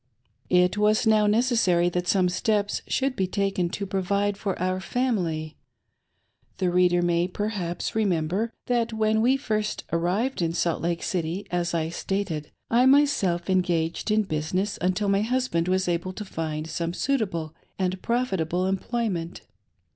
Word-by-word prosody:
It 180 +2 +3
was 215 +2 +3
now 215 -1 +4
necessary 210 -6 +3
that 180 0 -2
some 185 -1 +3
steps 205 +3 0
should 270 -1 0
be 190 -4 0
taken 195 -2 0
to 200 +2 -4
provide 200 +2 0
for 195 -1 -3
our 185 +1 0
family. 180 -10 -1 1.0
The 180 -2 +1
reader 175 0 +3
may, 175 0 +2
perhaps, 185 -3 -3
remember 195 +1 0
that 235 -2 0
when 220 0 +2
we 255 +4 +4
first 215 -5 -2
arrived 185 +9 0
in 165 -1 0
Salt 170 -1 0
Lake 170 0 -1
City, 180 +2 -2
as 175 -1 -1
I 160 -1 0
stated/ 170 -4 -3 0.2
1 245 +3 +5
my 285 +2 +7
self 180 -11 -1
engaged 175 -2 0
in 215 0 +3
business 185 +4 -2
until 185 +3 +1
my 195 0 +3
husband 235 -7 0
was 185 0 +1
able 175 +2 -1
to 210 - -6
find 155 -4 -4
some 170 +1 -3
suitable 185 - -1 0.2
and 185 0 -1
profitable 190 -8 0
employment. 190 -3 -2
185 Hz, 150 wpm, -25 LUFS, 175-215 Hz, 1.0 s, my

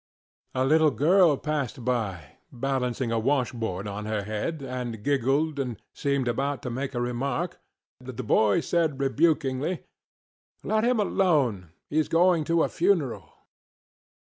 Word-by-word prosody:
A 130 0 +2
little 155 +2 +5
girl 165 +1 +4
passed 140 -6 -3
by, 105 - -2
balancing 125 -1 -2
a 115 - +1
wash 130 +1 +1
board 105 -5 -4
on 105 +1 -5
her 110 -1 -2
head, 110 +9 -3
and 125 -4 -5
giggled, 140 +3 +1
and 125 -5 -3
seemed 140 -3 -1
about 140 +3 -1
to 125 - -3
make 135 +2 -4
a - - 0
remark, 130 +8 -2 0.4
but 125 -2 -9
the 130 - -3
boy 105 -2 +3
said, 160 -5 0
rebukingly, 140 +2 +1 0.8
ŌĆ£Let 215 0 +1
him 245 -2 +2
alone, 145 - +1 0.2
heŌĆÖs 155 +1 +1
going 170 -1 +4
to 165 +1 +2
a - - +2
funeral. 145 - 0
135 Hz, 145 wpm, -26 LUFS, 120-155 Hz, 0.8 s, little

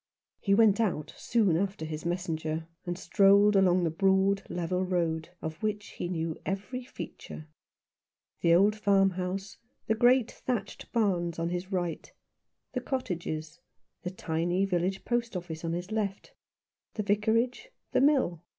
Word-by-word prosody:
He 200 -1 +2
went 220 -1 +5
out 155 -9 -1
soon 210 -8 +2
after 190 -2 -1
his 155 +1 -4
messenger, 160 -2 -2 0.2
and 175 0 -2
strolled 200 +3 +5
along 185 -2 +4
the 165 - +1
broad, 195 +2 +3
level 180 +1 -1
road, 170 -3 -1
of 160 0 -5
which 210 -1 -2
he - - -5
knew 165 -2 -2
every 205 +7 -4
feature. 155 -9 -8 0.9
The 170 0 +4
old 205 +4 +4
farmhouse 195 -2 +1 0.3
and 220 0 +1
great 245 -1 +5
thatched 220 -6 -4
barns 180 -7 +1
on 165 0 -1
his 180 +2 -4
right; 175 -4 -2 0.6
the 250 - -1
cottages 170 - -4 0.2
— - - -53
the 180 - -2
tiny 175 +1 0
village 185 +1 -1
post 235 -4 -1
office 170 -2 -7
on 165 0 -1
his 175 +4 -4
left 205 -3 -3 0.3
— - - -63
the 210 - -1
Vicarage 220 - +1
— - - -51
the - - +4
mill. 265 - +3
190 Hz, 150 wpm, -29 LUFS, 170-210 Hz, 0.9 s, went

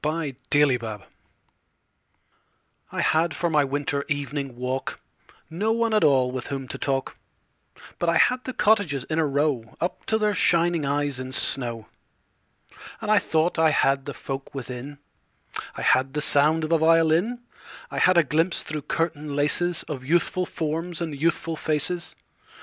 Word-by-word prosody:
Good 155 -3 -2 0.5
Hours 110 -3 -5 1.9
I - - -2
HAD 160 0 +2
for 170 +2 -1
my 150 -2 +4
winter 140 +1 -2
evening 145 -2 -3
walk 125 +2 -4 0.5
No 200 +7 -1
one 230 -1 0
at 215 - +3
all 130 -3 +3
with 130 -1 -5
whom 135 -2 -5
to - - -6
talk, 135 -1 -2 0.8
But 175 - +1
I 170 - +3
had 250 +6 +3
the 255 - -5
cottages 200 - +2
in 155 +3 -2
a 160 - +2
row 140 -5 -1
Up 175 - -3
to 220 - +2
their 210 -1 +1
shining 170 -4 +2
eyes 145 -2 -1
in 130 0 -6
snow. 120 -4 +2 1.1
And 215 -1 -2
I 215 - +6
thought 160 -2 0
I 160 -1 +5
had 135 -2 +2
the 145 - -6
folk 135 +1 -6
within: 130 +2 -7 0.8
I - - -5
had 130 +1 +3
the 150 - -1
sound 155 +3 +4
of 155 - -3
a 165 - +4
violin; 165 +8 +3 0.5
I - - -3
had 185 -1 +4
a 170 - +6
glimpse 165 +5 +1
through 155 -1 -4
curtain 155 -3 -2
laces 165 +4 +1
Of 135 -4 -6
youthful 175 +4 +1
forms 165 +2 -3
and 165 -3 -3
youthful 165 +2 -1
faces. 160 +3 -2
155 Hz, 160 wpm, -24 LUFS, 140-170 Hz, 1.9 s, I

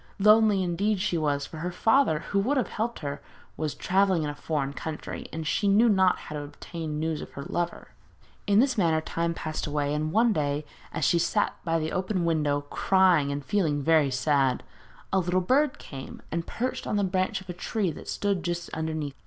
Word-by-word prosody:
Lonely, 210 -1 +5
indeed, 195 +4 0
she 190 -2 0
was, 145 -3 0
for 160 - -10
her 170 +3 -3
father, 225 - +3
who 200 - +2
would 260 +9 +1
have 255 - 0
helped 230 -1 -3
her, 140 -1 -4 0.3
was 155 -1 -3
travelling 190 -3 +2
in 150 - -2
a - - -7
foreign 145 -3 -2
country, 155 +1 -6
and 160 0 -5
she 200 +6 +1
knew 210 +4 +5
not 190 -4 +4
how 150 - -8
to 150 - -3
obtain 150 +1 -6
news 160 -1 -1
of - - -8
her 140 - -6
lover. 175 +1 -3 0.6
In 200 0 +4
this 260 -2 +3
manner 165 -4 +3
time 170 +1 -2
passed 155 -1 -4
away, 145 -1 -1
and 155 +1 -1
one 225 +4 +4
day, 145 -2 -1 0.3
as 155 - -1
she 170 - +3
sat 210 +5 +1
by 165 -2 +1
the 160 0 -2
open 185 -1 -1
window 150 -3 +1
crying 170 0 +3
and 140 0 -4
feeling 150 -5 +1
very 155 -2 +4
sad, 130 0 +1 0.5
a 190 - +4
little 180 0 +1
bird 260 +9 +2
came 135 -2 -9
and 165 +1 -2
perched 255 +2 -3
on - - -1
the 205 - +2
branch 185 0 0
of 190 - -14
a 180 - -4
tree 190 +1 -1
that - - -10
stood 200 -3 0
just 175 -1 -3
underneath. 160 -3 -3
170 Hz, 205 wpm, -27 LUFS, 150-195 Hz, 0.6 s, Lonely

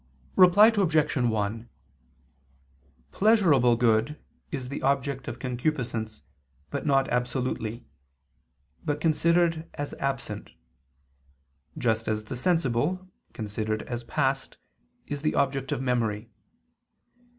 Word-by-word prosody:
_ - - -37 0.3
Reply 185 +4 +7
Obj. 160 -6 +2
1: 115 -2 -1 1.4
Pleasurable 170 - +4
good 115 +4 +2 0.3
is 130 -4 -5
the 140 - -5
object 135 0 0
of 120 - -5
concupiscence, 120 -4 -3 0.5
not 135 -2 +2
absolutely, 125 -2 -2 1.0
but 145 -2 -1
considered 165 +1 +2
as 145 0 -4
absent: 135 -6 -3 1.2
just 115 -2 0
as 110 0 -1
the 110 - -6
sensible, 165 +5 0 0.2
considered 110 -1 -3
as 120 -1 -5
past, 135 +1 -1 0.5
is 145 -1 -5
the 155 - 0
object 135 -1 0
of 135 - -1
memory. 115 -3 -1
130 Hz, 100 wpm, -27 LUFS, 115-150 Hz, 1.4 s, Reply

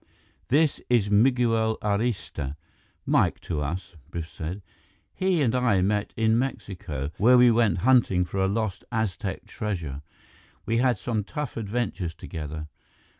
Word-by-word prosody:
"This 150 +3 +2
is 110 -5 +2
Miguel 115 -1 +3
Arista 100 - -1 0.5
Mike - - +2
to 75 -4 -3
us," 85 +4 -4
Biff 85 -2 -5
said. 90 +4 -6 0.5
"He 185 -5 +1
and 115 - +2
I 120 -7 +3
met 105 +1 0
in 110 +1 +3
Mexico, 85 - -4
where 125 +4 +6
we 125 -1 +7
went 115 -6 +3
hunting 120 -9 +4
for 95 +3 -4
a - - +3
lost 105 -1 -2
Aztec 105 -3 -2
treasure. 85 -10 -4 0.6
We 115 - +1
had 125 -2 +3
some 110 +1 -2
tough 150 +8 -5
adventures 105 -6 -2
together." 75 -1 -6
105 Hz, 135 wpm, -26 LUFS, 90-120 Hz, 0.6 s, we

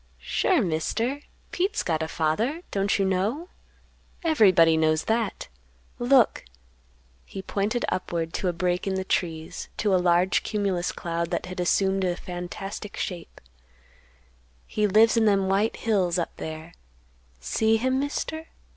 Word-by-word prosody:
"Sure, 360 - +1
Mister, 225 - -1 0.3
Pete's 390 +4 0
got 160 -2 -1
a 160 - -1
father; 215 - -1
don't 200 +1 +1
you 195 - +1
know? 210 - -1 0.7
Everybody 190 - +5
knows 155 0 +2
that. 225 -1 -1 0.5
Look!" 245 -1 +4 0.8
He 190 - -8
pointed 210 +6 -1
upward 165 -3 -2
to 190 - -2
a - - +2
break 180 +2 -1
in 190 - 0
the 190 - -1
trees, 165 -4 -3
to 205 -2 +1
a 185 - +3
large 180 +1 +3
cumulus 195 -5 -1
cloud 170 0 -3
that 175 - -2
had 185 0 -7
assumed 190 +2 +2
a 180 -1 0
fantastic 180 +4 -7
shape. 175 -3 -5 1.3
"He 210 0 0
lives 220 +3 +5
in 225 - +4
them 195 -2 +3
white 200 +4 +1
hills, 190 -6 +1
up 170 - -3
there. 160 +1 -7 0.7
See 220 - +1
him, 260 +3 0
Mister? 315 +3 -3
195 Hz, 140 wpm, -25 LUFS, 175-225 Hz, 1.3 s, Everybody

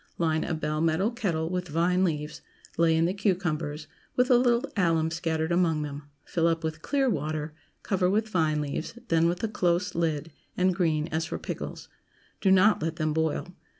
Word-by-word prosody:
Line 160 -2 +1
a 165 - -2
bell 155 0 -2
metal 165 +7 +2
kettle 175 -9 -2
with 180 0 -2
vine 175 +4 +2
leaves, 150 -4 -2 0.3
lay 165 -1 +3
in 165 +1 +3
the 180 - 0
cucumbers, 165 -7 -1 0.3
with 250 +1 +3
a - - +8
little 240 +1 +3
alum 165 -4 +2
scattered 160 -1 -1
among 165 -3 +2
them; 145 0 -7 0.2
fill 165 -1 +1
up 165 0 0
with 155 -1 -3
clear 275 - +1
water; 155 - -2 0.3
cover 185 -2 +1
with 215 +3 +1
vine 160 -7 +1
leaves, 150 +9 -4
then 165 0 +4
with 175 +4 -2
a - - +2
close 180 -5 0
lid, 160 -1 -1 0.3
and 185 0 +3
green 160 -4 +1
as 160 0 -1
for - - -4
pickles. - - -6 0.5
Do 195 - +3
not 190 +1 +5
let 160 +1 -2
them 155 -1 -1
boil. 160 +3 -1
165 Hz, 185 wpm, -27 LUFS, 155-185 Hz, 0.5 s, a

